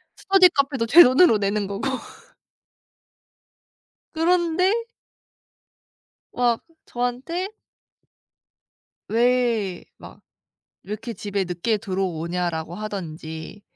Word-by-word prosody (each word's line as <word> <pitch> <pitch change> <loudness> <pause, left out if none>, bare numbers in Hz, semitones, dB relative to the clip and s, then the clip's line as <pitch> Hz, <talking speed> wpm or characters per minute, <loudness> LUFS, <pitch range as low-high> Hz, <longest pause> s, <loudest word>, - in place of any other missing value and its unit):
스터디 385 -2 +5
카페도 275 -6 0
제 340 +9 +9
돈으로 255 -1 +5
내는 200 0 -1
거고. 200 +6 -4 2.3
그런데 345 +2 +2 1.6
막 240 -2 +1 0.2
저한테 255 +10 -3 1.6
왜 230 -5 +1
막 - - -13 0.6
"왜 - - -14
이렇게 225 +3 -5
집에 200 -3 -3
늦게 180 +5 -1
들어오냐?"라고 175 -3 -3
하든지 170 -3 -7
225 Hz, 175 characters per minute, -23 LUFS, 190-275 Hz, 2.3 s, 제